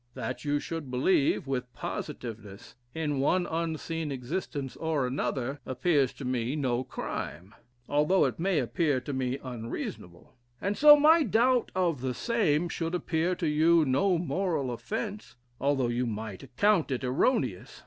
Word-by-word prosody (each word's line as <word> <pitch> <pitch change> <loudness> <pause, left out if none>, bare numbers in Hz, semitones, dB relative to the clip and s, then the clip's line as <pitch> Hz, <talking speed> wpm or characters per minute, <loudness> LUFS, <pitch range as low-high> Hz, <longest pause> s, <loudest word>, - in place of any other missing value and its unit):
That 125 0 -4
you 145 0 +1
should 160 -3 -5
believe, 135 +4 +2
with 125 -2 -3
positiveness, 105 -4 -7 0.2
in 150 -4 -1
one 175 +6 +2
unseen 165 -1 -3
existence 135 +1 -4
or 160 -5 -1
another, 130 +1 -2
appears 135 +1 +1
to 140 - -8
me 125 +1 -1
no 130 -4 0
crime, 95 -5 -6 0.3
although 150 +6 +3
it - - -2
may 185 0 +1
appear 145 +1 +1
to 140 +3 -6
me 130 0 -1
unreasonable; 115 -8 -7 0.3
and 200 +2 -1
so, 295 +3 +9
my 315 +3 +6
doubt 245 0 +2
of 170 -8 +1
the 130 -1 -2
same 175 -9 +1
should 165 0 -3
appear 175 +1 0
to 170 - -2
you 160 +2 +4
no 170 +8 +2
moral 170 -6 -1
offence, 210 - -5 0.2
although 135 -2 +1
you 120 +1 -1
might 110 -3 -5
account 205 -7 +2
it 130 -2 -2
erroneous. 130 - 0
145 Hz, 150 wpm, -29 LUFS, 125-175 Hz, 0.3 s, so